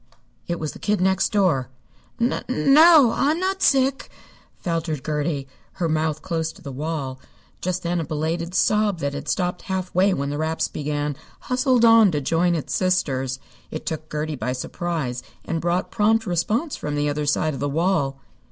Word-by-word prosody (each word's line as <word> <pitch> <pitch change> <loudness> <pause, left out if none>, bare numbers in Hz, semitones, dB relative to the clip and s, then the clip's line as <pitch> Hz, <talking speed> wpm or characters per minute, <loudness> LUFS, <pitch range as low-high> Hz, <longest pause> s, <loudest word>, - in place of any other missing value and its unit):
It 170 0 -2
was 155 -2 -3
the - - -12
Kid 210 -2 0
Next 190 +1 +2
Door. 180 -12 +2 0.5
"N 240 +2 +1
no, 280 0 +6
I'm 300 +4 +1
not 380 +1 -1
sick," 270 0 +2 0.5
faltered 165 -5 -3
Gertie, 150 -2 -2 0.3
her 175 -3 -1
mouth 155 -1 -1
close 165 -3 -2
to 195 - -17
the 140 - -6
wall. 140 -2 -4 0.4
Just 185 0 -2
then 175 0 0
a - - -1
belated 165 +3 -3
sob 210 0 +2
that 140 -3 -2
had 140 - -6
stopped 180 -1 -1
halfway 185 +1 0
when 140 -5 -1
the 145 - -3
raps 160 +1 0
began 145 0 -3 0.3
hustled 255 -2 +2
on 225 -2 +7
to 150 - +1
join 170 +5 +1
its 155 - -4
sisters. 135 -8 0 0.3
It 155 - -6
took 155 -1 -4
Gertie 150 0 -2
by 125 -1 -2
surprise, 130 -2 -3 0.2
and 165 -1 -2
brought 175 +3 -1
prompt 220 +1 +2
response 210 - -1
from 150 0 -4
the 145 0 0
other 145 0 -2
side 155 +1 +1
of 135 - -6
the 145 +2 -1
wall. 145 -4 0
165 Hz, 175 wpm, -23 LUFS, 150-195 Hz, 0.5 s, on